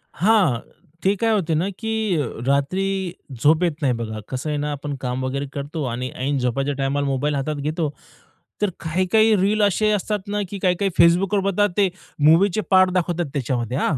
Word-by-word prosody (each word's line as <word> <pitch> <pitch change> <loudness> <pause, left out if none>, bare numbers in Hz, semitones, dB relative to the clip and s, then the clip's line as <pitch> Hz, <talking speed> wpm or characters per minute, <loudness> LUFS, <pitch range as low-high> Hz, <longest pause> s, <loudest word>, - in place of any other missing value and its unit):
हां, 185 - +3 0.4
ते 195 +2 +3
काय 225 +3 +1
होते 180 -7 +1
ना, 180 +6 0
की 220 0 -3 0.3
अ, 125 - -2 0.2
रात्री 185 +7 0 0.3
झोप 155 +4 +4
येत 170 - +2
नाही. 130 -3 +2
बघा 110 -2 -4
कसं 130 +4 -3
आहे 150 - -1
ना, 150 0 -2
आपण 145 0 -4
काम 125 0 -2
वगैरे 140 +2 -2
करतो 145 +2 -4
आणि 125 +2 -3
ऐन 135 +2 -1
झोपाच्या 135 +3 -1
टाईमाला 140 +1 0
मोबाईल 140 +2 0
हातात 150 +2 -2
घेतो. 150 +2 -2 0.7
तर 210 - +2
काही-काही 185 +7 +2
रील 205 +3 +2
असे 210 +2 +2
असतात 210 +1 -1
ना, 205 0 -1
की 200 - -5
काही-काही 190 +1 +1
Facebookवर 180 +4 +4
बघा 205 +2 +2
ते 195 -2 +4 0.3
मूव्हीचे 170 +8 +4
पार्ट 185 -1 +6
दाखवतात 175 -1 0
त्याच्यामध्ये. 125 -2 -2
हां. 145 - +1
160 Hz, 180 wpm, -22 LUFS, 140-195 Hz, 0.7 s, पार्ट